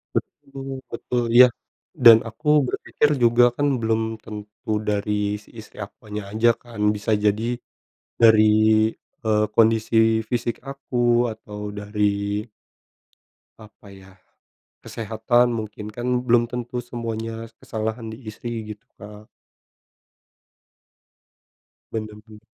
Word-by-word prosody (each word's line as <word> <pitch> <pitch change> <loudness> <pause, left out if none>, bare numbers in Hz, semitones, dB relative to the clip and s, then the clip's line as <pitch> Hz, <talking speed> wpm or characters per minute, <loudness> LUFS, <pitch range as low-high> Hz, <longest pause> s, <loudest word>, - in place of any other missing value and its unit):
Betul 135 -1 -5
betul, 120 +1 -2
iya. 125 +1 +10 0.6
Dan 115 -1 +11
aku 115 +7 -11 0.2
berpikir 145 - 0
juga 120 +1 +5
kan 145 - +2
belum 110 0 +1 0.2
tentu 105 0 -8 0.2
dari 105 0 -1
si - - -22
istri 110 - -14
akunya 105 0 -8
aja 110 +3 +3
kan, 120 -3 -11 0.2
bisa 105 +2 -3
jadi 105 +1 +2 0.8
dari, 110 -1 +7 0.8
eee, 105 -1 +2
kondisi 115 0 +3 0.3
fisik 120 -1 -1
aku 120 -3 +1
atau 105 -1 -11 0.2
dari 105 0 -1 1.2
apa 110 -1 -16
ya, 95 -1 -15 0.7
kesehatan 115 +2 0
mungkin, 110 -1 -6
kan 125 +2 -1
belum 120 -1 +3
tentu 125 0 -4
semuanya 115 -1 -5
kesalahan 110 +1 -4
di 110 - -7
istri 115 +1 -6
gitu, 105 +4 -16
Kak. 105 +1 -12 2.6
Bener 110 -1 -5
bener. 105 -1 -14
110 Hz, 105 wpm, -23 LUFS, 105-120 Hz, 2.6 s, Dan